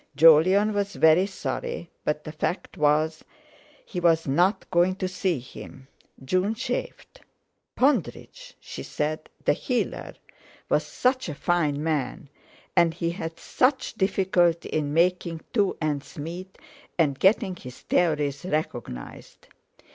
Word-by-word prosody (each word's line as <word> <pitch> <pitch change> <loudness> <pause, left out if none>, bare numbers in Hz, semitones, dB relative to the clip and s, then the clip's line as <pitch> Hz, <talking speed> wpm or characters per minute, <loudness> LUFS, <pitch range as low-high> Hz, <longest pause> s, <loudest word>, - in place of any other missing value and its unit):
Jolyon 165 +8 +6
was 200 0 -2
very 160 +4 +5
sorry, 180 -3 -5
but 150 0 -1
the 155 - -7
fact 160 +4 -3
was 155 +1 +1 0.6
he 180 - -4
was 165 -2 +3
not 180 +8 +2
going 180 +1 +3
to 190 -1 -2
see 185 -2 -1
him. 130 +1 -11 0.4
June 185 +9 +1
chafed. - - -5 0.5
Pondridge—she 400 - -2
said—the 155 0 -2
healer, 245 - -2 0.5
was - - +2
such 255 -5 0
a 150 - -5
fine 150 -4 0
man, 150 -2 -2 0.5
and 170 -2 +4
he 170 -1 -1
had 165 -2 -6
such 260 +1 +1
difficulty 185 -4 +1
in 150 -2 -1
making 170 0 +1
two 205 -4 +1
ends 150 -3 -3
meet, 175 +5 -7 0.4
and 145 -5 +2
getting 190 -1 +3
his 125 -7 -11
theories 150 -5 +1
recognised. 125 - -5
170 Hz, 120 wpm, -26 LUFS, 150-190 Hz, 0.6 s, Jolyon